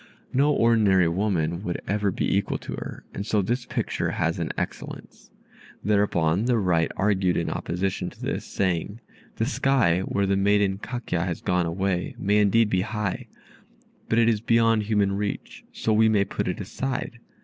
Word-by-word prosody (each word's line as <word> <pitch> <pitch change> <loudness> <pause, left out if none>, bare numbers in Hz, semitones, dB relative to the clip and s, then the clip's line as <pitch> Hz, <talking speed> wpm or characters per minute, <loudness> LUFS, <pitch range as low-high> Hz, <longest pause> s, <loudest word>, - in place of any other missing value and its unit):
No 140 +3 +3
ordinary 110 - +4
woman 85 -2 0
would 90 -4 -3
ever 105 0 +1
be 95 - 0
equal 100 - 0
to - - -9
her, - - -7
and 100 - -4
so 105 0 +1
this 120 +5 -2
picture - - -2
has 80 +2 -1
an 85 - -2
excellence." - - -6 0.5
Thereupon 100 -2 +2
the 125 -1 +2
right 90 -5 +1
argued 95 -3 +2
in 85 - -1
opposition 95 +3 -2
to - - -19
this, - - -3
saying, 95 +3 -2 0.4
"The 110 - 0
sky, 125 -10 +2
where 100 +1 -1
the 100 0 +2
maiden 100 0 +2
Kakya 115 -8 -3
has 90 -3 -3
gone 90 -1 0
away, 90 +1 -1
may 105 +1 +1
indeed 105 +2 +4
be 90 - +2
high, 105 -2 -3 0.8
but 115 - +2
it 115 -1 +5
is 110 -3 +2
beyond 115 -1 +3
human 105 -2 +1
reach, 105 0 -4
so 110 - -1
we 110 +1 +5
may 100 -2 +3
put - - -3
it 90 - -2
aside. 120 +4 -4
100 Hz, 170 wpm, -25 LUFS, 90-110 Hz, 0.8 s, it